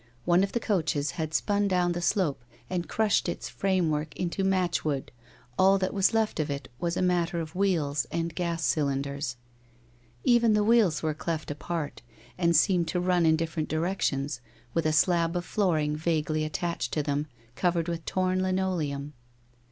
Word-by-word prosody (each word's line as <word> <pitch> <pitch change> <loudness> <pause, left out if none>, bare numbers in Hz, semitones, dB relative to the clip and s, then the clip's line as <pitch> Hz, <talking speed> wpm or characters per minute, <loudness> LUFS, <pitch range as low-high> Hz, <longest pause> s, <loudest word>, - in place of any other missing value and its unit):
One 175 +2 +4
of 200 - -2
the 235 - +1
coaches 160 -9 0
had 160 -2 -4
spun 205 +4 +1
down 180 -2 +2
the 175 0 -2
slope 165 - 0 0.3
and 175 -3 -2
crushed 215 -4 +2
its - - -4
frame 185 -4 +1
work 150 0 -2
into 180 +2 -2
match 185 -2 +1
wood, 140 -4 -2 0.5
all 195 +1 +6
that 190 -1 -1
was 195 -1 +3
left 220 -5 0
of 155 - 0
it 140 -1 -4
was 170 0 -1
a - - +1
matter 175 -1 +1
of 160 -1 -5
wheels 165 -7 0
and 170 0 -2
gas 170 -1 -2
cylinders. 140 -3 -1 0.9
Even 235 -2 +4
the 210 0 +3
wheels 205 -10 +3
were 155 -1 +1
cleft 155 0 -3
apart 150 0 -4 0.3
and 170 -1 +2
seemed 175 +1 +3
to 170 +3 -1
run 180 -2 +2
in 160 - +5
different 160 -1 -2
directions, 150 -5 -1 0.3
with 165 -2 +1
a - - +2
slab 165 +3 +2
of 175 0 -2
flooring 155 -7 +1
vaguely 155 -1 0
attached 170 +3 -2
to 150 - 0
them, 145 +1 -1 0.3
covered 175 -2 +1
with 170 -1 -3
torn 185 +1 0
lineoleum. 175 -7 -1
170 Hz, 175 wpm, -28 LUFS, 155-185 Hz, 0.9 s, all